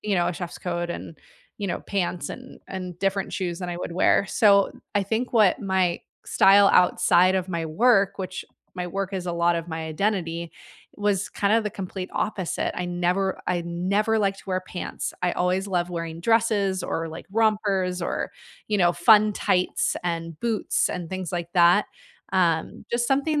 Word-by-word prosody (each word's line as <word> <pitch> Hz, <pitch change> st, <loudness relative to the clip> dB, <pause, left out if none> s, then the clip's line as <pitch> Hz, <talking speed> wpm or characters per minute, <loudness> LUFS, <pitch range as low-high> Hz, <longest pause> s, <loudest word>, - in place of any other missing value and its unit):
you 210 Hz, -1 st, -1 dB
know, 175 Hz, -2 st, +2 dB
a -, -, 0 dB
chef's 175 Hz, 0 st, -6 dB
coat 175 Hz, -1 st, -3 dB
and, 165 Hz, -1 st, -7 dB, 0.4 s
you 205 Hz, -, -3 dB
know, 175 Hz, -, -3 dB
pants 180 Hz, -3 st, -2 dB
and -, -, -10 dB
and 180 Hz, -2 st, -6 dB
different 195 Hz, 0 st, -1 dB
shoes 175 Hz, -3 st, -3 dB
than 180 Hz, -, -5 dB
I 175 Hz, -, -4 dB
would 175 Hz, -, -5 dB
wear. 185 Hz, +3 st, +3 dB
So 200 Hz, -2 st, +4 dB, 0.2 s
I 205 Hz, -, +2 dB
think 220 Hz, +5 st, -2 dB
what 215 Hz, +2 st, +4 dB
my 190 Hz, -3 st, 0 dB, 0.2 s
style 200 Hz, +1 st, +6 dB
outside 180 Hz, +1 st, +4 dB
of 185 Hz, 0 st, -1 dB
my 165 Hz, -2 st, -2 dB
work, 200 Hz, +3 st, +3 dB
which 185 Hz, -1 st, -5 dB, 0.3 s
my 180 Hz, -1 st, -4 dB
work 195 Hz, +2 st, -3 dB
is 185 Hz, -2 st, -4 dB
a 175 Hz, -, -1 dB
lot 170 Hz, 0 st, +2 dB
of 165 Hz, 0 st, -5 dB
my 160 Hz, -1 st, -4 dB
identity, 170 Hz, -1 st, -2 dB, 0.5 s
was 205 Hz, -1 st, 0 dB
kind 200 Hz, 0 st, 0 dB
of 225 Hz, 0 st, +4 dB
the 210 Hz, -, -1 dB
complete 185 Hz, -1 st, -6 dB
opposite. 190 Hz, -5 st, -2 dB
I 180 Hz, -, -3 dB
never 180 Hz, +2 st, 0 dB
I 175 Hz, -1 st, 0 dB
never 200 Hz, +6 st, 0 dB
liked 195 Hz, -2 st, 0 dB
to -, -, -14 dB
wear 185 Hz, -1 st, -1 dB
pants. 180 Hz, -, -5 dB
I 180 Hz, -, +1 dB
always 180 Hz, +2 st, 0 dB
loved 180 Hz, -2 st, -1 dB
wearing 165 Hz, -1 st, -5 dB
dresses 205 Hz, -3 st, +2 dB
or, 165 Hz, -1 st, -2 dB
like, 160 Hz, -, -9 dB
rompers 200 Hz, -4 st, +1 dB
or, 170 Hz, -, -2 dB, 0.4 s
you 210 Hz, -1 st, 0 dB
know, 175 Hz, -2 st, +4 dB
fun 210 Hz, +4 st, +5 dB
tights 180 Hz, 0 st, +1 dB
and 165 Hz, -2 st, -4 dB
boots 230 Hz, -3 st, 0 dB
and 175 Hz, -1 st, -5 dB
things 185 Hz, -2 st, -4 dB
like 170 Hz, -1 st, -3 dB
that. 175 Hz, +3 st, +5 dB, 0.5 s
Um, 170 Hz, -1 st, +1 dB
just 235 Hz, 0 st, 0 dB
something 290 Hz, +3 st, +1 dB
185 Hz, 185 wpm, -24 LUFS, 175-200 Hz, 0.5 s, style